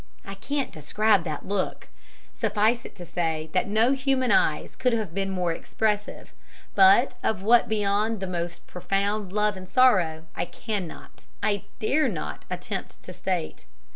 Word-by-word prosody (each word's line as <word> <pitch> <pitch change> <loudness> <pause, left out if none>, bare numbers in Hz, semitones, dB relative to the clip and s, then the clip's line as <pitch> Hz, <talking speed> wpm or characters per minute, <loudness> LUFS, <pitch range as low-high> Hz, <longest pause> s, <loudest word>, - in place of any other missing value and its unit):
I 195 - -6
can't 275 +8 -3
describe 195 +5 +2
that 155 -3 -5
look; 200 -1 -2 0.5
suffice 220 +3 +1
it - - -10
to 175 - -9
say 160 -2 -2
that 185 - +1
no 220 +5 +3
human 265 -2 +1
eyes 380 0 +2
could 250 -2 +1
have 215 -7 -2
been 195 +1 -1
more 180 -3 0
expressive, 210 +4 -2 0.4
but 200 +6 +6
of 195 -3 -1
what 235 +3 +5
beyond 210 +1 +1
the 190 - -3
most 175 -1 -4
profound 195 +2 -2
love 210 0 +1
and 185 -1 -10
sorrow 180 -11 +3
I - - -1
cannot, 195 -1 -6 0.2
I 205 -2 0
dare 275 +7 +2
not, 115 - -5
attempt - - -5
to - - -9
state. 80 - -3
200 Hz, 155 wpm, -26 LUFS, 180-220 Hz, 0.5 s, but